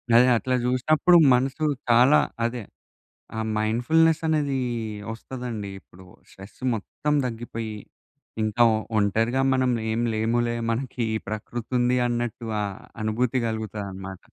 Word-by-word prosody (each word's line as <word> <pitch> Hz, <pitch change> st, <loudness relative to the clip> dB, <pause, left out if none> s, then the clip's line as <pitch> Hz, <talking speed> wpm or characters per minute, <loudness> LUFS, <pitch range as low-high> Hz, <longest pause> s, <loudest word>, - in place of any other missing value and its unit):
అదే 125 Hz, +2 st, +7 dB
అట్లా 130 Hz, +2 st, -1 dB
జుసినప్పుడు 155 Hz, +8 st, +4 dB, 0.2 s
మనసు 135 Hz, +5 st, 0 dB, 0.2 s
చాలా 125 Hz, +5 st, +6 dB, 0.2 s
అదే 120 Hz, 0 st, -1 dB, 0.8 s
ఆ -, -, -1 dB, 0.2 s
మైండ్‌ఫుల్‌నెసనేది 150 Hz, +5 st, +2 dB, 0.5 s
వస్తదండి. 115 Hz, -4 st, -6 dB
ఇప్పుడు 95 Hz, +1 st, -17 dB, 0.3 s
స్ట్రెస్ 95 Hz, +5 st, -14 dB
మొత్తం 150 Hz, +7 st, -2 dB
తగ్గిపోయి 115 Hz, -2 st, -5 dB, 0.7 s
ఇంకా 110 Hz, +2 st, +1 dB, 0.4 s
ఒంటరిగా 115 Hz, +6 st, +1 dB
మనం 130 Hz, -1 st, +2 dB, 0.2 s
ఏం 115 Hz, +1 st, 0 dB
లేములే 120 Hz, +2 st, 0 dB
మనకి 125 Hz, +1 st, -3 dB
ఈ -, -, +1 dB
ప్రకృతుంది 120 Hz, +3 st, -1 dB
అన్నట్టు 120 Hz, -1 st, -3 dB
ఆ -, -, 0 dB, 0.4 s
అనుభూతి 120 Hz, +4 st, 0 dB
కలుగుతాదన్నమాట. 100 Hz, -4 st, -5 dB
120 Hz, 105 wpm, -25 LUFS, 110-130 Hz, 0.8 s, అదే